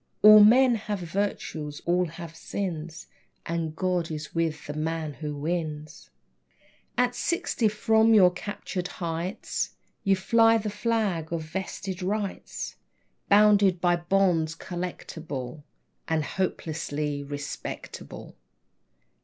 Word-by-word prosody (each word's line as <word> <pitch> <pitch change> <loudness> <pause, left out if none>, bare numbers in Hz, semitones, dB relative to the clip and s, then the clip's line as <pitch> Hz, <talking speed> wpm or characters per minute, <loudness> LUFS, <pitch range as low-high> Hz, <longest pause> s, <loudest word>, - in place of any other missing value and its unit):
All 215 0 +10
men 250 +4 +6
have 210 -2 -3
virtues, 165 -5 -3
all 180 +1 +2
have 165 0 -9
sins, 165 -2 -5 0.4
And 165 -2 -2
God 180 -2 0
is 155 -1 -6
with 160 -3 -1
the 145 - -5
man 155 0 -2
who 150 +2 -5
wins. 155 0 -4 0.9
At 245 0 +2
sixty, 340 - 0
from 220 +1 +3
your 185 -4 +7
captured 185 -1 -5
heights 170 +2 -3 0.3
You 195 -1 +4
fly 225 +4 +4
the 210 -1 -3
flag 210 -7 -1
of 165 -1 -2
Vested 190 +3 -5
Rights, 200 +1 -3 0.5
Bounded 205 -3 +5
by 175 0 +3
bonds 170 -2 +1
collectable, 160 -6 -6 0.5
And 160 -1 +1
hopelessly 150 -5 -2
respectable! 145 0 -7
175 Hz, 110 wpm, -27 LUFS, 160-205 Hz, 0.9 s, All